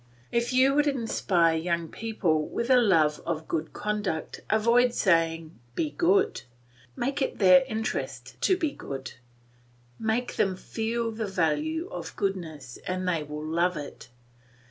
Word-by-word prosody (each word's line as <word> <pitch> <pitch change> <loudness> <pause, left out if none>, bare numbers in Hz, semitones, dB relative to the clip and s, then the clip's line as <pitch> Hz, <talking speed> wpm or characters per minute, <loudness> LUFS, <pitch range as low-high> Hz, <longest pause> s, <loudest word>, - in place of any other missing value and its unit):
If 235 +1 0
you 260 +2 +4
would 295 +1 +3
inspire 195 - +2
young 170 0 -1
people 175 -7 -1
with 235 +2 -2
a 255 - +7
love 160 -9 +3
of 160 -1 -3
good 160 -1 -2
conduct 205 -6 -3
avoid 235 +3 +3
saying, 165 - +1 0.2
"Be 305 - -1
good;" 395 +6 +2 0.5
make 275 +3 -2
it 265 - -1
their 200 +7 +7
interest 135 - -4
to 375 - +3
be 315 -5 0
good; 135 - -7 0.9
make 225 +3 -1
them 190 -2 +2
feel 230 +4 -2
the 220 -1 -3
value 300 - 0
of - - -6
goodness 165 - -4
and 185 0 -2
they 170 -3 +1
will 150 +1 -6
love 170 +2 +1
it. 145 -4 -8
195 Hz, 145 wpm, -27 LUFS, 160-235 Hz, 0.9 s, a